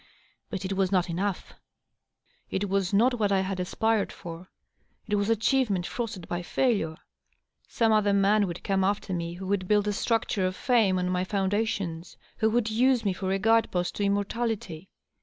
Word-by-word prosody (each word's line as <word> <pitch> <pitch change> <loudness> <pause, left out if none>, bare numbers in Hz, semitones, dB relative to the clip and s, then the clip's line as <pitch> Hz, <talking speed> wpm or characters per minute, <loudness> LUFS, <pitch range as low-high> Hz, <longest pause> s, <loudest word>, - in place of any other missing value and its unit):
But 195 -3 -4
it 190 - -2
was 190 -1 0
not 180 -2 +1
enough; 190 +2 -3 1.0
it 200 +2 -1
was 195 -1 0
not 240 +4 +3
what 205 -2 +2
1 195 -1 +2
had 190 0 -3
aspired 220 +4 0
for; 170 +2 -9 0.6
it 210 - -3
was 205 +1 0
achievement 220 -4 +1
frosted 210 -7 -5
by 175 0 -3
failure. 175 -6 0 0.7
Some 225 -1 +1
other 210 -2 +3
man 200 +1 +3
would 175 0 -6
come 195 -1 +1
afl; 200 +1 0
er - - 0
me 170 -1 -3
who 190 +2 -7
would 190 -1 -1
build 210 0 +2
a 205 - +1
structure 215 -3 0
of 185 - -4
fame 220 -7 +2
on 180 0 0
my 180 0 0
foundations, 195 -4 -2 0.2
who 220 - +2
would 225 -1 0
use 245 +1 +2
me 195 - +2
for 190 +1 -3
a 195 - +2
guide 225 +3 +3
post 180 -1 -1
to 205 - -1
immortality. 200 -3 -2
200 Hz, 185 wpm, -27 LUFS, 185-220 Hz, 1.0 s, not